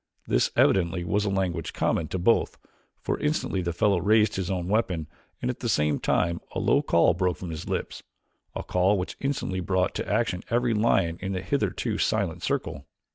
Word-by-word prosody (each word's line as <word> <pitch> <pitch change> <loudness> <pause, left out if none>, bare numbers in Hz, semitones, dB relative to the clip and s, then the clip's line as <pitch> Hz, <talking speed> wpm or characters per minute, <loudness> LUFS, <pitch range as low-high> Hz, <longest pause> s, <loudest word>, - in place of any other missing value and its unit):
This, - - +2
evidently, 90 -1 +3
was 100 +4 0
a - - +1
language 90 -4 -2
common 80 - 0
to 95 - -3
both, 95 +6 +2 0.5
for - - -1
instantly 150 -10 -1
the 85 -1 -2
fellow 90 +2 +2
raised 110 +3 +3
his 95 -2 -2
own 90 -2 -2
weapon 95 -6 0 0.4
and 125 - +1
at 125 - -10
the 120 - -2
same 75 -6 +1
time 85 0 0
a - - -2
low - - +3
call 85 +1 +3
broke 90 -1 0
from 90 -3 -6
his 80 - -6
lips, - - -3 0.5
a - - -3
call 95 +3 +2
which 90 - -4
instantly 135 -9 -2
brought 95 0 0
to - - -4
action 90 - 0
every 120 0 +1
lion 95 -6 +2
in 95 0 -3
the 90 - -2
hitherto - - -1
silent - - 0
circle. 70 0 -3
95 Hz, 190 wpm, -26 LUFS, 85-105 Hz, 0.5 s, evidently